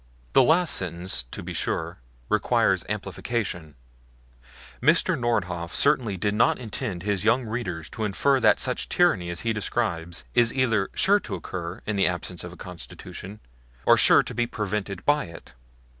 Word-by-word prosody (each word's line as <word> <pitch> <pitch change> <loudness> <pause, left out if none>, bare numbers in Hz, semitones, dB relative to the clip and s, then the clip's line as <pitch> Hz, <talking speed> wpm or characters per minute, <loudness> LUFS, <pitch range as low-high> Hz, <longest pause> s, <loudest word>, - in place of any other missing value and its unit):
The - - +7
last 160 +6 +3
sentence, 90 -5 -2
to - - -7
be - - -6
sure, 80 0 -2 0.3
requires - - +2
amplification; 85 -10 -3 1.1
Mr. - - +3
Nordhoff 90 -8 -1
certainly 110 -7 +2
did 100 +3 0
not 110 - +3
intend 110 -6 -5
his 100 -2 0
young 115 +3 +3
readers 95 -9 -4
to 110 - -4
infer 135 +7 +2
that - - +4
such 130 -1 -1
tyranny 105 - +2
as 85 -1 -4
he 115 -1 0
describes 90 -6 -2
is 120 -1 +4
either 115 -7 +1
sure 200 +4 +4
to - - -5
occur 85 0 -6
in 105 -1 -2
the 95 - +4
absence 90 0 -4
of 85 - -7
a 90 - -13
Constitution 95 +3 -9 0.4
or - - +7
sure - - +6
to - - -6
be 120 0 0
prevented 105 -4 -4
by 145 0 +3
it. 85 -6 -12
105 Hz, 160 wpm, -25 LUFS, 90-120 Hz, 1.1 s, The